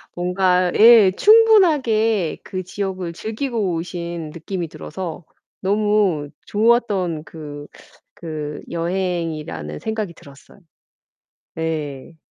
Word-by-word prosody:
뭔가 180 0 +1
예 225 -4 +8
충분하게 270 - +4
그 185 -1 -5
지역을 185 -2 -4
즐기고 220 -1 -2
오신 170 -2 -5
느낌이 170 +2 -5
들어서 175 +1 -7 0.4
너무 200 -6 +1 0.2
좋았던 205 -7 +1
그 150 -2 -9 0.5
그 155 -3 -5
여행이라는 170 -2 -3
생각이 220 -5 -3
들었어요. 140 +6 -17 1.0
예. 155 -2 -4
180 Hz, 205 characters per minute, -21 LUFS, 165-215 Hz, 1.0 s, 예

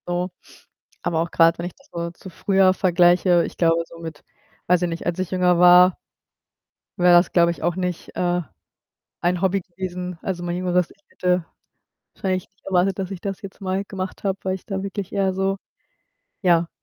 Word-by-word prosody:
So. 175 +1 -1 0.7
Aber 160 -1 0
auch 170 - -3
grad, 165 0 +4
wenn 170 - -3
ich 180 - -9
das 275 +1 -25
so 170 0 -4
zu 180 +2 -12
früher 190 +1 +3
vergleiche, 175 -1 +4
ich - - -9
glaube 165 -1 +3
so 170 - -13
mit 160 -3 -8 0.4
weiß 180 0 +3
ich 175 - +1
nicht, 165 0 -5
als 175 +1 -2
ich 185 -1 -2
jünger 180 -2 +3
war 180 0 +7 1.0
wäre 175 -1 +7
es, 175 - -2
glaube 170 -1 +4
ich, 170 - -8
auch 175 0 +1
nicht, 180 -2 -4
äh, 175 0 0 0.8
ein 175 0 +1
Hobby 195 0 +1
gewesen 180 -1 -6
also, 180 -2 -3
mein 175 0 -2
jüngeres 180 -1 0
Ich - - -21
hätte 180 -1 0 0.7
wahrscheinlich 185 -3 -2
nicht 195 - -41
erwartet, 190 0 +1
dass 190 -1 -3
ich 190 -3 -6
das 195 +2 -5
jetzt 195 -1 -10
mal 190 0 -2
gemacht 190 -2 -6
habe, 195 -1 0
weil 190 0 -1
ich 190 - -8
da 195 -2 -3
wirklich 200 -1 -5
eher 195 -1 +1
so, 195 +1 0 0.9
ja. 170 -3 +3
180 Hz, 195 wpm, -22 LUFS, 175-190 Hz, 1.0 s, war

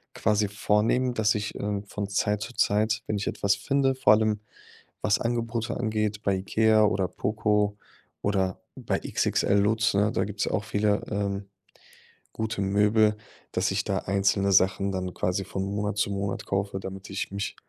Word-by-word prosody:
quasi 105 -1 +2
vornehmen, 110 +5 +1
dass 110 -1 +2
ich, 105 -1 -3
ähm, 100 0 -3
von 100 0 -5
Zeit 105 +1 0
zu 115 +3 -6
Zeit, 110 +1 +1
wenn 105 - -1
ich 100 - -3
etwas 100 0 +1
finde, 135 +6 +1
vor 105 -5 +5
allem, 110 -1 +2 0.6
was 105 0 +3
Angebote 115 0 -2
angeht, 105 -1 -1
bei 100 -1 +2
Ikea 110 +3 +3
oder 95 -2 +1
Poco 105 +1 0 0.5
oder 95 -2 0 0.2
bei - - -2
XXL 100 0 +1
Lutz, 110 +2 +2
ne, 105 +2 +3
da - - 0
gibt's 100 0 -3
auch 110 - -1
viele, 105 -1 +1
ähm, 100 -1 -2 0.9
gute 110 -2 -3
Möbel, 105 +2 +3 0.3
dass - - 0
ich - - 0
da - - 0
einzelne 100 0 +1
Sachen 95 +1 +3
dann 90 -1 -3
quasi 90 +2 -1
von 95 - -3
Monat 105 +1 -2
zu 100 - +1
Monat 100 0 -3
kaufe, 95 0 -2
damit 95 +1 -8
ich 95 0 -4
mich, 100 0 -4
105 Hz, 165 wpm, -26 LUFS, 100-110 Hz, 0.9 s, vor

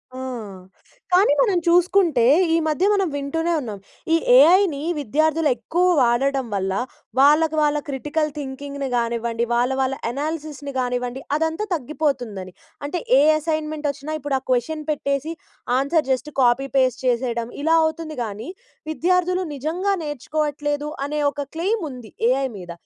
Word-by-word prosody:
ఆ! - - -7 1.0
కానీ 365 -4 +5
మనం 405 -7 +2
చూసుకుంటే, 345 -6 +4 0.3
ఈ - - +4
మధ్య 310 +5 +1
మనం 390 -3 +1
వింటూనే 325 +4 -1
ఉన్నాం. 215 -5 -6 0.3
ఈ - - +6 0.2
ఏఐని 330 -1 +5 0.2
విద్యార్థులెక్కువ 310 +2 +1 0.2
వాడడం 260 +2 +2
వల్ల, 190 0 -1 0.5
వాళ్ళకు 305 +3 +5
వాళ్ళ 295 0 +2
క్రిటికల్ 295 +3 -1
థింకింగ్‌ని 280 0 -5
గానివ్వండి, 235 0 -1
వాళ్ళ 245 +2 +2
వాళ్ళ 265 +1 0 0.2
అనాలిసిస్‌ని 295 0 -5
గానివ్వండి, 250 +1 -2 0.2
అదంతా 320 +6 -1
తగ్గిపోతుందని. 245 - -3 0.3
అంటే 340 +4 -3 0.2
ఏ - - +5 0.2
అసైన్‌మెంటొచ్చినా 310 -2 -3
ఇప్పుడా 275 -1 -1
క్వెషన్ 300 +6 0
పెట్టేసి, 280 +2 -2 0.5
ఆన్సర్ 280 +1 +1
జస్ట్ 280 +4 -1
కాపీ 250 +2 +3
పేస్ట్ 255 -1 +2
చేసేయడం. 235 -1 -1
ఇలా 325 +1 +4
అవుతుంది 315 -1 -3
గానీ, 215 - -6 0.4
విద్యార్థులు 360 +2 +1
నిజంగా 345 +8 -1
నేర్చుకోవట్లేదు, 295 +1 -2 0.2
అనే 300 +1 -2
ఒక 285 -1 -5
క్లెయిముంది 325 - -3 0.2
ఏఐ 270 0 +1
మీద. 175 -2 -8
290 Hz, 125 wpm, -22 LUFS, 255-320 Hz, 1.0 s, ఈ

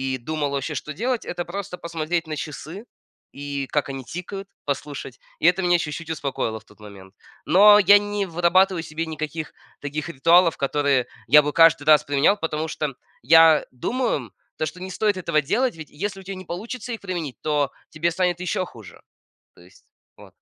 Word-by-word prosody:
и - - -4
думал 145 +2 -3
вообще, 140 +2 -3
что 150 +2 -5
делать- 240 - -2
это 175 0 -4
просто 180 0 -6
посмотреть 165 0 -3
на 155 - -4
часы 160 - -7 0.5
и 140 -1 -5
как 150 -1 -1
они 135 -1 -6
тикают, 195 +3 -7 0.2
послушать. 140 -2 -5 0.2
И - - -2
это 180 +2 +4
меня 175 -1 +3
чуть-чуть 160 0 -5
успокоило 135 -7 -3
в - - -25
тот 105 - -21
момент. 100 -2 -13 0.3
Но 205 +3 +7
я 200 +1 +7
не 205 -1 -2
вырабатываю 175 +1 +2
себе 160 +1 -4
никаких 155 0 -5 0.3
таких 150 +3 -4
ритуалов, 165 +4 +4
которые 140 -2 +1 0.2
я 150 +4 +8
бы 150 - -1
каждый 165 0 +5
раз 155 -1 +5
применял, 145 +8 +3
потому 160 0 -2
что 150 -4 -3 0.3
я 160 +3 +6
думаю, 245 - -1
м, 120 -6 -9 0.3
то, 155 - -1
что 180 +4 -7
не 185 - -6
стоит 210 +1 +1
этого 170 -4 +1
делать. 235 - 0
Ведь 155 -2 -9
если 195 +6 -5
у - - -14
тя 195 +1 -6
не 185 -1 -10
получится 225 +7 -6
их 225 - -6
применить, 170 - -5
то 145 -3 0 0.2
тебе 165 +2 -1
станет 180 0 0
ещё 180 0 -1
хуже. 105 - -14 0.5
То - - -19
есть 90 +2 -20 0.3
вот. - - -14
160 Hz, 190 wpm, -23 LUFS, 145-185 Hz, 0.5 s, я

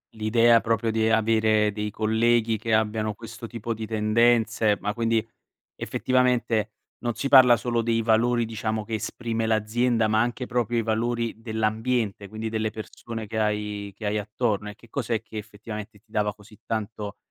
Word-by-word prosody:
L'idea 115 +2 +4
proprio 115 0 0
di 110 0 +1
avere 110 -1 +3
dei 105 0 -3
colleghi 110 +1 +2
che 110 +1 -2
abbiano 110 0 +1
questo 115 +2 -9
tipo 115 0 -4
di 110 0 -6
tendenze, 110 -1 +2
ma 105 0 -1
quindi, 115 -1 +1 0.5
effettivamente, 125 -4 +1 0.3
non 120 -1 0
si 140 - -3
parla 130 -3 +8
solo 120 0 -1
dei 115 0 +1
valori 115 +1 +2
diciamo 110 -1 -3
che 115 - -3
esprime 115 0 -3
l'azienda, 110 +1 +1
ma 110 +1 +3
anche 120 +1 -2
proprio 120 -1 0
i - - +2
valori 115 +1 -1
dell'ambiente, 110 -1 -1
quindi 110 +2 -5
delle 110 -1 -1
persone 110 0 -7
che 110 +2 -5
hai 105 -1 -2
che 105 -1 -5
hai 105 +1 0
attorno 105 0 -1
e 105 - -9
che 115 - -19
cos'è 115 -3 -2
che 110 - -10
effettivamente 105 0 -8
ti 110 +1 -34
dava 105 -1 0
così 105 0 -18
tanto, 105 -2 -4
110 Hz, 165 wpm, -25 LUFS, 110-115 Hz, 0.5 s, parla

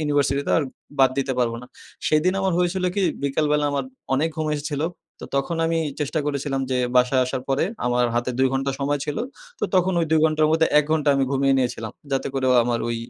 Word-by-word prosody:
University 145 -2 +1
তো - - -1
আর - - +1 0.4
বাদ 130 -1 +6
দিতে 135 -1 0
পারব 120 -2 +1
না। - - -10 0.4
সেদিন 155 +4 +3
আমার 190 -2 +1
হয়েছিল 180 +1 0
কি 200 - 0 0.2
বিকালবেলা 150 +1 +1
আমার 140 -2 -1 0.3
অনেক 155 +5 +1
ঘুম 155 -1 -1
এসেছিল। 145 -1 -3 0.4
তো - - -7
তখন 150 +5 -1
আমি 165 0 0 0.2
চেষ্টা 150 +2 -1
করেছিলাম 140 -1 -2
যে 130 - +1 0.2
বাসায় 125 +1 +4
আসার 130 0 -3
পরে 135 +3 +2 0.2
আমার 125 0 +2
হাতে 120 +1 0
২ 130 - +4
ঘন্টা 135 +1 0
সময় 145 +1 0
ছিল। 150 - -3 0.4
তো - - +1
তখন 185 0 +3
ওই 165 - 0
২ 160 - +4
ঘন্টার 155 -1 +3
মধ্যে 160 0 +3
১ 150 - +3
ঘন্টা 155 -2 +1
আমি 135 - +2
ঘুমিয়ে 135 0 +2
নিয়েছিলাম। 120 -4 -2 0.2
যাতে 135 - 0
করেও 130 -1 +2
আমার 120 -1 0
ওই 115 - -1
140 Hz, 210 wpm, -23 LUFS, 130-155 Hz, 0.4 s, বাদ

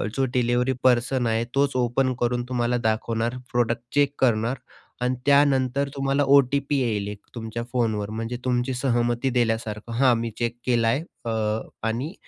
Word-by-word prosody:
जो 135 - +2
delivery 125 +1 +1
person 125 0 +2
आहे 115 0 +1
तोच 140 0 +2
ओपन 130 +1 +1
करून 120 0 0
तुम्हाला 120 -1 0
दाखवणार 115 +2 -1
प्रोडक्ट 120 -1 +1
चेक 145 -1 +3
करणार 120 0 +2 0.4
आणि 125 +1 +1
त्यानंतर 140 -1 +3
तुम्हाला 135 +1 +1
ओ-टी-पी 140 +1 +2
येईल 110 -5 -1
एक 105 -1 -6 0.2
तुमच्या 115 0 -5
फोनवर 110 -4 0
म्हणजे 115 +2 -4
तुमची 125 +1 0
सहमती 120 0 0
दिल्यासारखं 115 -3 -1
हा 130 -2 +5
मी 115 -1 -2
चेक 120 0 -2
केला 120 -2 +2
आहे 130 +7 +2 0.2
अ, 110 -1 0 0.3
आणि 125 +9 -2
120 Hz, 150 wpm, -24 LUFS, 115-130 Hz, 0.4 s, हा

